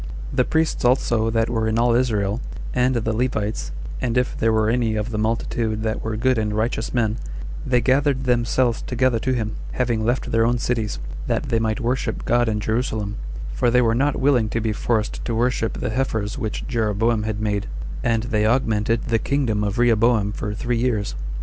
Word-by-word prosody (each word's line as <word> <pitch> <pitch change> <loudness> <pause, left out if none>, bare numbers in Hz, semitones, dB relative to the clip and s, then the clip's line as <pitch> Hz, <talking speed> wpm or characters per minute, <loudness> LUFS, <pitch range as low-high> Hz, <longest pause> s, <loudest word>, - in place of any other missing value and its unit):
The - - +3
priests 160 0 0
also 120 -3 +2
that 115 0 +1
were 115 -2 0
in 110 0 +1
all 120 0 +3
Israel, 110 -3 +1 0.3
and 125 +1 +2
the 115 -1 0
Levites, 110 -3 -1 0.3
and 125 -1 0
if 125 0 +1
there 115 - +2
were 110 -1 +2
any 115 -1 +1
of 105 +2 -2
the 105 - -2
multitude 110 0 -1
that 110 -1 -2
were 110 -1 -2
good 130 +1 +2
and 105 -1 -1
righteous 110 +1 -1
men, 115 -3 +1 0.5
they 125 -2 +3
gathered 135 +2 +2
themselves 120 -1 +1
together 125 -1 +1
to 130 - -1
him, 110 -3 -2 0.2
having 120 -3 0
left 120 +3 0
their 115 0 +3
own 120 +1 +2
cities, 115 -3 -1 0.3
that - - -1
they 115 - +2
might 110 +2 0
worship 125 +1 -1
God 120 -1 +3
in 105 -1 0
Jerusalem; 110 -2 -1 0.4
for 120 - +2
they 125 +1 +4
were 115 -1 +3
not 140 +4 +1
willing 130 -6 +3
to 115 - -1
be 110 -1 -1
forced 110 0 -1
to 115 - -2
worship 120 -1 +1
the - - -3
heifers 110 -4 -1
which 110 -6 -4
Jeroboam 110 -1 +1
had 105 -1 -3
made; 105 -1 -1 0.4
and 115 -2 +1
they 110 -3 +1
augmented 115 -2 +1
the 115 -1 +2
kingdom 120 -7 0
of 100 -1 -1
Rehoboam 115 -3 +3
for 105 0 -4
three 120 +2 -1
years. 115 -4 0
115 Hz, 195 wpm, -22 LUFS, 110-125 Hz, 0.5 s, they